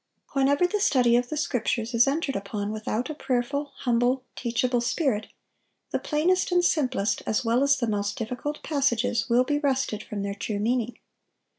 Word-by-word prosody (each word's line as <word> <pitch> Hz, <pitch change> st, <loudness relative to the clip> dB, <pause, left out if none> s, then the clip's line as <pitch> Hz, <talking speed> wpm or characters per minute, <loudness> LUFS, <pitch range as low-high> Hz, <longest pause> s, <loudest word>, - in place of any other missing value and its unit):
Whenever 280 Hz, +4 st, +3 dB
the 420 Hz, +4 st, 0 dB
study 250 Hz, -10 st, +4 dB
of 245 Hz, 0 st, +1 dB
the 305 Hz, -, -3 dB
Scriptures 245 Hz, -4 st, -1 dB
is 235 Hz, +3 st, +5 dB
entered 280 Hz, -1 st, 0 dB
upon 205 Hz, +1 st, -3 dB
without 220 Hz, +5 st, -3 dB
a -, -, -3 dB
prayerful, 275 Hz, +1 st, -2 dB
humble, 245 Hz, +1 st, +1 dB
teachable 245 Hz, +1 st, 0 dB
spirit, 240 Hz, -4 st, 0 dB, 0.6 s
the -, -, 0 dB
plainest 355 Hz, +5 st, +1 dB
and 355 Hz, 0 st, +3 dB
simplest 255 Hz, -, +1 dB
as 225 Hz, +3 st, 0 dB
well 235 Hz, +3 st, +2 dB
as 280 Hz, 0 st, +4 dB
the 240 Hz, -, 0 dB
most 205 Hz, +1 st, -1 dB
difficult 250 Hz, +5 st, -4 dB
passages 260 Hz, -4 st, 0 dB
will 240 Hz, +2 st, +4 dB
be 290 Hz, +3 st, 0 dB
wrested 270 Hz, -7 st, 0 dB
from 205 Hz, -2 st, -5 dB
their 200 Hz, 0 st, -2 dB
true 205 Hz, +1 st, -4 dB
meaning. 235 Hz, +2 st, -1 dB
250 Hz, 170 wpm, -26 LUFS, 225-280 Hz, 0.6 s, is